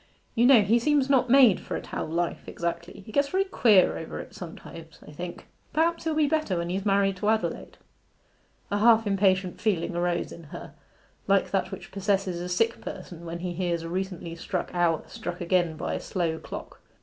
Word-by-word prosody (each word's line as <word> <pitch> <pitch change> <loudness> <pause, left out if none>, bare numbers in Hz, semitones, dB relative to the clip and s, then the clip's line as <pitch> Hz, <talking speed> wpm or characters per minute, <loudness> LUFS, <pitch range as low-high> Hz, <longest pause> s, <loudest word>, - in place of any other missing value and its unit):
You 240 +1 +4
know, 250 -6 +7
he 225 +4 +3
seems 280 +1 +2
not 255 -2 +3
made 250 -6 +6
for - - -5
a - - -3
town - - -5
life 175 0 -2
exactly: 170 +2 -4
he - - -10
gets 280 +5 +2
very 380 +4 +2
queer 225 - +4
over 160 - -6
it - - -9
sometimes, 165 -1 -10
I - - -10
think. 175 +4 -7 0.3
Perhaps 330 +2 +1
he'll 320 -1 0
be 310 -1 +3
better 305 - 0
when 170 +1 -2
he's 195 +3 -2
married 195 -1 +2
to 205 +3 0
Adelaide.' 220 0 -1 0.9
A 205 - +1
half 225 0 +5
impatient 190 -2 +1
feeling 185 -5 0
arose 175 0 -1
in 170 - -11
her, 150 - -9 0.5
like - - +2
that - - 0
which - - -8
possesses 195 -3 -1
a 180 - -5
sick 225 +6 +1
person 175 -3 -8
when 170 0 -5
he 175 0 -4
hears 170 -2 -1
a 165 - -5
recently 180 -2 -4
struck 175 +2 -4
hour 175 -2 +1
struck 175 0 -6
again 175 -2 +1
by 175 - -3
a - - -2
slow 165 -4 -2
clock. - - -9
185 Hz, 195 wpm, -27 LUFS, 170-225 Hz, 0.9 s, know